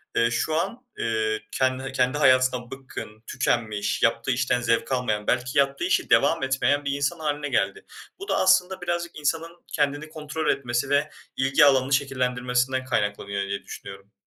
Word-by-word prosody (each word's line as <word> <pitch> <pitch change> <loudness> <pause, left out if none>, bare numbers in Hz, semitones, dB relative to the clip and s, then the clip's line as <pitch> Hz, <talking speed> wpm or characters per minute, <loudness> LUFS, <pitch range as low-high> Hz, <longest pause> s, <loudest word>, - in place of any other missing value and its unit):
eee, 115 0 +3
şu 155 +5 0
an, 230 +9 -1 0.2
eee, 110 -1 0
kendi 130 0 0
eee, 135 - -5
kendi 130 +1 +1
hayatından 130 -3 +3
bıkkın, 130 -5 -9
tükenmiş, 110 -5 -1
yaptığı 115 +3 +2
işten 125 0 +1
zevk 115 +2 0
almayan, 110 -5 -1
belki 125 +1 0
yaptığı 140 +2 +1
işi 180 - +1
devam 165 -4 +3
etmeyen 135 +2 +1
bir 140 - 0
insan 140 +4 -1
hâline 145 -2 -2
geldi. 100 -6 -1 0.3
Bu 395 - -8
da - - +1
aslında 185 0 +3
birazcık 175 -2 -3
insanın 165 +3 -2
kendini 145 +1 -1
kontrol 155 0 -5
etmesi 120 0 0
ve 145 +2 +2 0.3
ilgi 135 +3 +4
alanını 135 0 +3
şekillendirmesinden 130 -1 0
kaynaklanıyor 100 -4 -1
diye 100 0 -4
düşünüyorum. 100 +1 -10
130 Hz, 160 wpm, -25 LUFS, 120-145 Hz, 0.3 s, ilgi